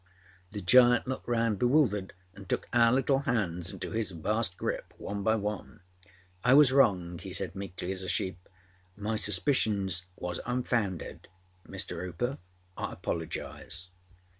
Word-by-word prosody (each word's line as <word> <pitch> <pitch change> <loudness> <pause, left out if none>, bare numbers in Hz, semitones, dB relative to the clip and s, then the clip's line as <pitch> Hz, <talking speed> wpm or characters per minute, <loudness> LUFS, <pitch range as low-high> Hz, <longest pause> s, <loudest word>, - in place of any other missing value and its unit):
â - - -23
The 105 - -4
giant 120 +5 +6
looked 130 +1 -4
round 115 -4 +1
bewildered 120 -7 +2 0.2
and 100 -1 -12
took - - -1
our 115 -1 +5
little 135 +1 +3
hands 95 -10 -1
into - - -6
his 110 -2 -1
vast 95 +3 -1
grip, - - -4
one 100 0 -4
by 110 +3 +3
one. 105 -2 -4 0.6
âI 130 +3 +6
was 145 -3 +7
wrong,â 90 -11 +3
he - - -7
said - - -1
meekly 95 -2 -5
as 95 -1 -4
a 95 - -4
sheep. 90 0 -2 0.5
âMy 105 +1 -1
suspicions 100 - +2
was 90 0 -4
unfounded. 120 -7 -2 0.4
Mr. - - -4
Hooper, 110 +10 -3 0.4
I - - -4
apologise. 85 +2 -5
105 Hz, 145 wpm, -30 LUFS, 90-120 Hz, 0.6 s, was